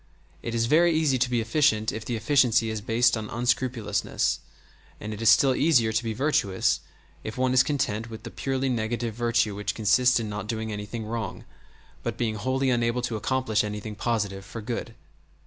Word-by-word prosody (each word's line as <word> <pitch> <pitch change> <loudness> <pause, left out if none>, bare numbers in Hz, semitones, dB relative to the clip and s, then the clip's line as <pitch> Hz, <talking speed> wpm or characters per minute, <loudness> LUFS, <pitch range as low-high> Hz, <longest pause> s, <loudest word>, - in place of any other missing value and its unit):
It 115 0 -4
is 115 0 +2
very 170 +7 +4
easy 150 -5 +2
to 125 0 +1
be 120 -2 +1
efficient 110 -2 +2
if 110 - -5
the 120 +1 -3
efficiency 115 -1 +3
is 110 -1 -4
based 120 +3 +3
on 110 -1 -5
unscrupulousness, 120 -3 0 0.6
and 105 +1 -5
it 105 - -7
is 115 - +5
still 130 +4 +5
easier 125 -7 +3
to 110 +2 +1
be 115 - -2
virtuous 115 -8 +1 0.4
if 110 +3 -6
one 130 0 +1
is 130 - +6
content 125 -6 -1
with 110 -1 -9
the 115 - -7
purely 135 0 -2
negative 115 -1 -1
virtue 120 -2 +1
which 105 +1 -3
consists 125 +4 +3
in 110 - -3
not 105 -1 -5
doing 110 0 -3
anything 105 +2 -5
wrong, 110 -3 -5 0.6
but - - -4
being 115 -2 0
wholly 130 +5 0
unable 120 0 0
to 120 -2 -2
accomplish 130 0 0
anything 105 0 -5
positive 105 -3 -2
for 105 +4 -8
good. 115 +1 -5
115 Hz, 185 wpm, -26 LUFS, 110-125 Hz, 0.6 s, is